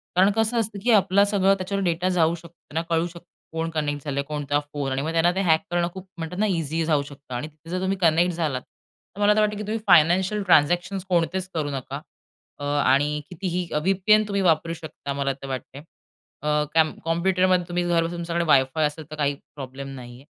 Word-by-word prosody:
कारण 190 +3 +5
कसं 225 +1 +1
असतं 210 -2 -2
की 240 - +3
आपला 200 -1 +5
सगळं 195 -1 +3
त्याच्यावर 195 +1 -2
डेटा 175 +1 0
जाऊ 170 -2 +2
शकतो, 170 0 -14 0.2
त्यांना 160 +2 -1
कळू 165 +1 +2
शकतं, 170 0 -13 0.3
कोण 165 0 -2
कनेक्ट 145 -3 -2
झालंय, 140 -1 -1
कोणता 145 -1 -1
फोन 145 -2 -5
आणि 135 - -1
मग 160 +3 -2
त्यांना 165 +1 +3
ते 195 - +1
हॅक 160 -4 +3
करणं 175 0 +1
खूप 190 0 -9
म्हणतात 165 +2 -5
ना 215 - +3
इझी 165 -3 -1
जाऊ 150 -3 +2
शकतं 140 -2 -12
आणि 125 +6 -3
तिथे 155 +1 -17
जर 185 +1 -2
तुम्ही 190 +1 0
कनेक्ट 175 0 +3
झालात. 155 -6 -1 0.5
तर - - -10
मला 205 0 +5
तर - - +3
वाटतं, 210 -1 +1
की 210 - -4
तुम्ही 215 +2 -2
फायनान्शियल 180 +4 +4
ट्रान्झॅक्शन्स 175 +3 +2
कोणतेच 180 +1 +1
करू 155 -3 -1
नका. 135 -3 -5 0.6
अ, - - -7
आणि 145 +1 +2
कितीही 180 -1 -3
व्हीपीएन 195 +7 +3
तुम्ही 200 -1 0
वापरू 165 -1 +2
शकता 155 -3 -7
मला 140 0 -1
तर 135 - -7
वाटतं. 135 +1 -6 0.6
अ, 150 0 +1
कॅम 160 -1 +4
कॉम्प्युटरमध्ये 185 +2 +2
तुम्ही 175 0 -1
घरबसून 170 0 +1
तुमच्याकडे 170 0 -1
वायफाय 140 +1 +3
असेल, 150 +1 -8
तर - - -5
काही 145 -2 0 0.2
प्रॉब्लेम 135 0 -7
नाहीये. 125 +1 -11
165 Hz, 205 wpm, -24 LUFS, 150-185 Hz, 0.6 s, कारण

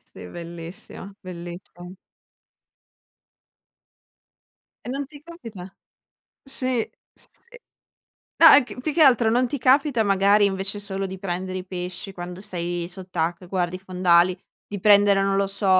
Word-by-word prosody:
sì - - -13
bellissimo, 170 - -9
bellissimo. 175 0 -10 2.9
E - - -8
non 275 +2 -3
ti 290 +1 -14
capita 230 - -11 0.7
sì, 255 -3 -1 0.2
sì. - - -8 1.1
No 325 -1 +10
è 290 - +7
che 250 - -10
mhmm, - - -9
più 310 - -2
che 320 - +3
altro 245 -5 +5
non 245 +2 +2
ti 285 - -3
capita 260 -1 +3
magari 200 +1 +4
invece 195 +1 0
solo 195 -1 -4
di 190 0 -8
prendere 185 0 -4
i 180 - -7
pesci 180 +1 -6
quando 180 0 -8
sei 175 -3 -3
sott'acqua 180 -1 -4
e - - -19
guardi 180 -1 -1
i - - -11
fondali, 180 -1 +2 0.3
di 205 - -6
prendere, 200 0 +5
non 195 0 +1
lo 195 0 +1
so, 200 +1 -2
195 Hz, 145 wpm, -23 LUFS, 180-225 Hz, 2.9 s, No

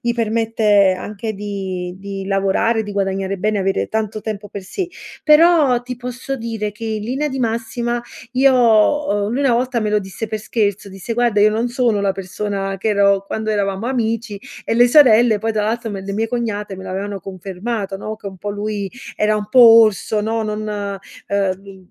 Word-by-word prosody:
gli 240 -2 0
permette 220 -4 +2
anche 215 +2 -5
di 190 -3 -5
di 195 0 -6
lavorare, 195 +3 +1
di 210 - -7
guadagnare 195 -1 -1
bene, 210 +2 0
avere 195 0 0
tanto 215 -1 -2
tempo 210 -1 -5
per 200 - -7
sé; 360 - -4 0.3
però 300 -5 +5
ti 250 +1 -5
posso 250 +2 -5
dire 225 -3 -4
che 210 - -16
in 215 -1 -3
linea 270 +6 -1
di 270 -1 -4
massima, 235 0 -2 0.3
io 265 +1 +4
o 225 -2 +3
lui 245 - -1
una 275 -3 +3
volta 250 0 0
me 215 -2 -1
lo 210 0 +2
disse 195 +3 -6
per 215 0 -4
scherzo, 205 -2 -1
disse: 195 +4 -6
"Guarda, 240 -3 +2
io 210 +1 +6
non 225 +3 0
sono 240 -4 +1
la 200 -1 +1
persona 195 +1 -3
che 220 - -1
ero 200 -1 +3
quando 220 +2 -4
eravamo 200 +1 -1
amici"; 230 -4 -2 0.2
e 225 - -1
le 245 +1 +5
sorelle 240 -5 +6
poi, 225 +2 -1
tra 215 -1 0
l'altro, 225 +2 -2
me 195 - -5
le 195 +1 -5
mie 220 +2 0
cognate 220 -4 -3
me 190 - -9
l'avevano 195 +1 -4
confermato, 195 +3 -5
no, 215 +2 -6
che 210 - -11
un 190 -1 -7
po' 205 +3 -4
lui 205 -1 -3 0.2
era 210 0 +1
un 210 - -3
po' 255 - +5
orso, 220 -3 +6
no, 225 +1 -1
non, 210 -2 -3 0.3
ehm 195 -1 -3
215 Hz, 190 wpm, -19 LUFS, 200-230 Hz, 0.3 s, io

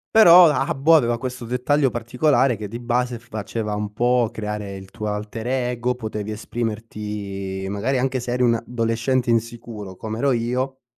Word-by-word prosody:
però, 180 -5 +9
Habbo 145 +1 +3
aveva 120 -6 +3
questo 125 0 -5
dettaglio 130 +4 +1
particolare, 125 +2 +2
che 105 -1 -6
di 115 +3 -6
base 120 0 -1
faceva 110 -1 -4
un 105 0 -3
po' 120 +1 +2
creare 105 -2 -5
il 95 0 -11
tuo 105 - -5
alter 105 +2 -4
ego, 125 -1 0
potevi 110 -3 -5
esprimerti, 105 -4 -4
magari 110 +7 -1
anche 130 0 0
se 120 0 -4
eri 125 - 0
un 120 - +4
adolescente 115 +2 -1
insicuro 115 -4 -3
come 110 +2 -5
ero 140 +2 +2
io, 125 +3 -1
115 Hz, 160 wpm, -22 LUFS, 105-125 Hz, -, però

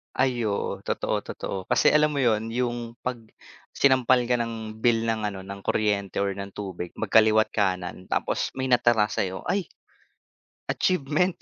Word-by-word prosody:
Ay, 125 -3 +1
oo, 100 - -2
totoo, - - -1
totoo, 100 - -5
kasi - - +4
alam 150 0 +3
mo 140 - -1
'yun 110 -2 +2
yung, 120 0 -1 0.3
pag 130 -1 -2 0.6
sinampal 130 -2 +4
ka 120 0 +1
ng 110 -2 -5
bill 115 -2 +3
ng 110 -1 0
ano 95 -1 -7
ng 100 0 -8
kuryente 100 -3 0
or 100 0 0
ng 100 +1 -6
tubig 95 -4 -5
magkaliwa't 110 0 +4
kanan 95 -3 -1
tapos - - 0
may 130 - -1
natira 120 -3 +4
sa'yo, 95 0 -2
ay, 195 -4 -1 1.0
achievement 180 +1 +1
110 Hz, 150 wpm, -25 LUFS, 100-125 Hz, 1.0 s, kasi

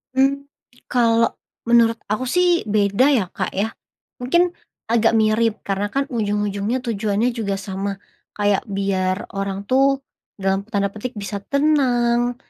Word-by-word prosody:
Mmm, 275 +1 +2 0.5
kalau 230 -2 +3 0.3
menurut 235 -1 +4 0.2
aku 235 +5 0
sih 355 -1 +2
beda 205 +3 +2
ya 215 - +2
Kak - - -3
ya, 215 +3 0 0.5
mungkin 345 +8 +2 0.4
agak 230 -1 +3
mirip 220 0 +2
karena 200 +1 -1
kan 275 +6 -1
ujung-ujungnya 210 +2 -1
tujuannya 220 +1 0
juga 210 -4 -2
sama, 195 +1 -4 0.4
kayak 205 -1 +1
biar 195 -1 -1
orang 195 0 -3
tuh, 270 +4 +2 0.3
dalam 195 +1 -1
tanda 200 -3 -1
petik 225 +4 -6
bisa 200 0 -4
tenang, 245 -2 +1
220 Hz, 130 wpm, -21 LUFS, 200-245 Hz, 0.5 s, menurut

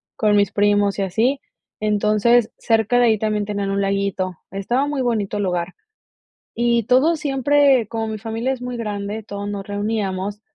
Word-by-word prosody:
con 210 -2 +2
mis 200 -2 +3
primos 205 -1 +2
y 200 - 0
así. 230 +9 +1 0.4
Entonces, 215 +2 +2
cerca 225 +1 +1
de 245 - +5
ahí 220 -2 +3
también 215 -1 -1
tenían 200 -1 -3
un 200 0 0
laguito, 195 -2 -1 0.2
estaba 240 +9 -1
muy 290 -2 -2
bonito 215 -4 -1
el 205 - -1
lugar. 180 -1 -2 0.8
Y 235 0 +2
todo 260 +7 +4
siempre, 280 -4 +2
como 225 -1 -3
mi 220 -1 -4
familia 225 +4 -3
es 250 - -8
muy 250 -1 -5
grande, 210 -1 -4
todos 200 -1 -6
nos 200 -1 -5
reuníamos 205 -1 -3
215 Hz, 170 wpm, -21 LUFS, 200-240 Hz, 0.8 s, de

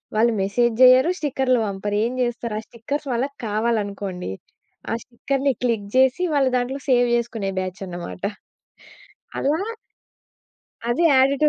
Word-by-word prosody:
వాళ్ళు 230 +2 +3
మెసేజ్ 230 +5 +2
జేయ్యరు, 255 +5 +7
స్టిక్కర్‌లు 265 -4 +1
పంపరు 205 +1 -2
ఏం 240 - -1
జేస్తారు 235 -2 -2
ఆ - - -6
స్టిక్కర్స్ 280 +5 -5
వాళ్ళకి 270 +4 -2
కావాలనుకోండి, 205 - -2 0.6
ఆ - - +1
స్టిక్కర్ని 270 +3 -1
క్లిక్ 225 -5 0
జేసి 265 +7 +4
వాళ్ళు 270 -3 +3
దాంట్లో 260 +3 -2
సేవ్ 245 -1 +4
చేసుకునే 225 -4 -2
బ్యాచనమాట. 185 -1 -6 1.1
అలా 295 +3 +1 1.3
అది 240 +8 +1
యాడ్ 270 0 +5
టు 300 - +6
240 Hz, 125 wpm, -22 LUFS, 205-265 Hz, 1.3 s, జేయ్యరు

